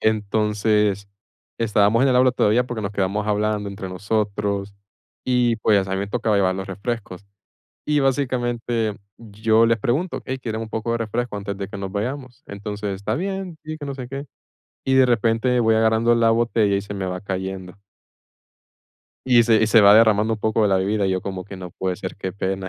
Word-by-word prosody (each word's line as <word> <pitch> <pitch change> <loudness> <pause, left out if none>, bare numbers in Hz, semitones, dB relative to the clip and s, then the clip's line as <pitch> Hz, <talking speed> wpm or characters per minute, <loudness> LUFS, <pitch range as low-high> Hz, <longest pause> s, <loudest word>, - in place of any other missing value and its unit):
entonces, 105 -1 +1 0.5
estábamos 110 +1 +3
en 135 - +4
el 125 - +3
aula 130 0 +4
todavía 120 +1 +2
porque 120 -3 -5
nos 100 - -3
quedamos 100 +1 -1
hablando 105 -1 0
entre 95 -1 -7
nosotros 100 +1 -2 0.5
y, 125 -2 +2
pues, 105 -3 +2
a 95 - -4
mi 95 - -1
me 100 - -2
tocaba 110 -1 0
llevar 95 -2 +2
los 95 - -5
refrescos, 100 -1 -5 0.6
y 150 0 +1
básicamente 120 -5 -1 0.2
yo 110 +1 +2
les 115 0 +2
pregunto: 145 - -1
"Ey, 130 0 -4
¿quieren 110 -4 -4
un 110 - -7
poco 110 +1 -2
de 115 - 0
refresco 115 0 -3
antes 100 -1 -5
de 100 -1 -4
que 100 - -8
nos 95 -1 -5
vayamos? 125 +3 -5
Entonces, 105 0 -5
está 100 +3 -3
bien, 190 +1 -4
sí, 155 0 -5
que 150 - -8
no 140 -1 -5
sé 130 -2 -7
qué", 135 +2 -6 0.6
y 135 - +1
de 130 -1 +6
repente 120 +1 +1
voy 110 -1 +3
agarrando 110 +1 +3
la 115 -1 +3
botella 115 -3 +2
y 100 - 0
se 105 0 -8
me 100 -1 -3
va 90 0 -4
cayendo 95 -2 -5 1.5
y 120 -2 +6
se 115 -1 +4
y - - +4
se 110 +1 +6
va 100 0 +8
derramando 110 0 +4
un - - -9
poco 110 +1 +1
de 105 - +3
la 95 - +3
bebida, 100 +1 0
y - - 0
yo 95 -1 -1
como 95 -2 -5
que: 100 -1 -9
"No 90 -1 -8
puede 95 +1 -3
ser, - - -6
qué 95 -2 -5
pena 95 0 -3
110 Hz, 205 wpm, -22 LUFS, 100-120 Hz, 1.5 s, va